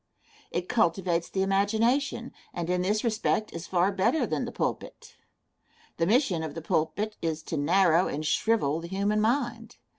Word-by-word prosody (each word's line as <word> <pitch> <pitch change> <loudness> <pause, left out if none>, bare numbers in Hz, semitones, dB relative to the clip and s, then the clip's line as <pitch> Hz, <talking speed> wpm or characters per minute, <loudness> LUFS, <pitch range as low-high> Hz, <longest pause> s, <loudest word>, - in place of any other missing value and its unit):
It 175 +1 -3
cultivates 175 -5 +1
the 190 - 0
imagination, 225 +6 +1 0.2
and 175 0 -2
in 180 0 +1
this 205 +4 0
respect 220 -1 0
is 170 0 -6
far 185 +2 +2
better 230 +10 +1
than - - -2
the - - -6
pulpit. - - -4 0.8
The 165 - +1
mission 210 - +2
of 155 -2 -5
the 165 - -5
pulpit 185 +6 -1
is 160 -1 -2
to 160 - -4
narrow 175 +3 +3
and 150 +2 -4
shrivel 160 -4 +1
the 170 - -7
human 200 +3 0
mind. 235 -1 -1
190 Hz, 160 wpm, -27 LUFS, 170-220 Hz, 0.8 s, narrow